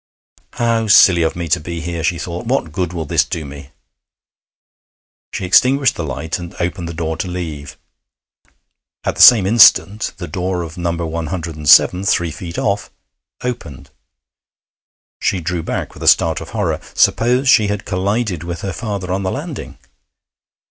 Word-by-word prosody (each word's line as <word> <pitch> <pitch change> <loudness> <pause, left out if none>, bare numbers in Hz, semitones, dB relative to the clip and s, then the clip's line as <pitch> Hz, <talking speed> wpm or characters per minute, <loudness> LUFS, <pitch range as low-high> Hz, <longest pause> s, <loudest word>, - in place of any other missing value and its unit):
'How 115 -1 0
silly 95 -3 +6
of 80 - 0
me 85 -1 -4
to - - +2
be 85 +2 -6
here!' 85 0 -5
she 85 +1 0
thought. 85 +5 -6
'What 120 - -1
good 90 +2 -3
will 85 -3 -5
this - - +2
do 80 - -5
me?' 70 0 -11 1.6
She - - -4
extinguished 130 +8 +3
the 85 - -5
light 75 +3 -4
and 85 -1 -9
opened 85 0 -3
the - - -6
door 80 -1 -3
to 95 - -3
leave. 80 -6 -6 1.3
At - - -2
the - - -1
same 115 -6 +8
instant 105 -1 +4
the 85 - -7
door 90 +2 -3
of 80 0 -9
No. 85 -2 -2
107, 80 +1 +2
three 85 -3 +1
feet 85 +2 -8
off, 100 -1 -1 0.5
opened. 75 - -6 1.3
She 95 - 0
drew 85 0 -3
back - - -4
with - - -14
a - - -3
start - - +3
of - - -9
horror. - - -2 0.2
Suppose 125 +4 +2
she 110 -4 +5
had 105 0 -4
collided 100 -2 -2
with 85 0 -6
her 95 -2 -4
father 100 -5 -5
on 95 - -2
the 95 - -2
landing! 150 - -6
90 Hz, 160 wpm, -17 LUFS, 80-100 Hz, 1.6 s, same